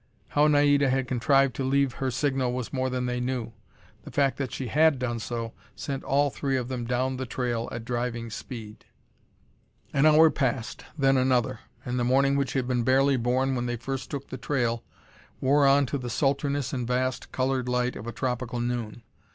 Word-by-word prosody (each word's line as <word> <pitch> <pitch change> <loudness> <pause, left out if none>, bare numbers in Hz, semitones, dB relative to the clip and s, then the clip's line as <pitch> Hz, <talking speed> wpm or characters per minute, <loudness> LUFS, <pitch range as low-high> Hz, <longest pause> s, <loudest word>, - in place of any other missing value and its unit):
How 145 +1 +4
Naida 145 -1 +4
had 130 0 0
contrived 135 +1 +2
to 135 - -1
leave 135 -1 +2
her 135 - -2
signal 130 -1 0
was 125 0 -4
more 130 -1 0
than 125 0 -2
they 125 0 -1
knew. 125 -2 -3 0.5
The - - -9
fact 135 -2 +1
that 135 -4 -3
she 135 - -4
had 150 +4 +3
done 120 -2 -2
so, 115 0 -4 0.2
sent 135 -2 -4
all 140 +1 +2
three 135 -1 -1
of 125 -1 -3
them 125 -2 -3
down 130 +2 -1
the 130 -1 -4
trail 120 -1 -2
at 115 -1 -6
driving 120 -1 -3
speed. 110 -2 -8 1.1
An 140 +2 +4
hour 155 +1 +7
passed, 130 -4 -2
then 135 -2 +3
another, 125 -3 +1 0.3
and 125 0 -2
the - - +1
morning 135 +3 +3
which 140 -3 0
had 130 -2 -1
been 125 -1 +1
barely 135 +3 +3
born 130 +2 +1
when 125 -1 -1
they 120 - -1
first 135 +3 -5
took 140 -2 -6
the 130 - -5
trail, 120 -4 -1 0.6
wore 140 +1 +4
on 140 +1 +5
to 140 +2 -3
the 125 -1 -5
sultriness 140 +1 0
and 125 -3 -2
vast, 125 0 -1
colored 130 -1 0
light 125 0 0
of 110 - -8
a - - -3
tropical 125 0 -3
noon. 120 -1 -3
130 Hz, 195 wpm, -27 LUFS, 120-135 Hz, 1.1 s, hour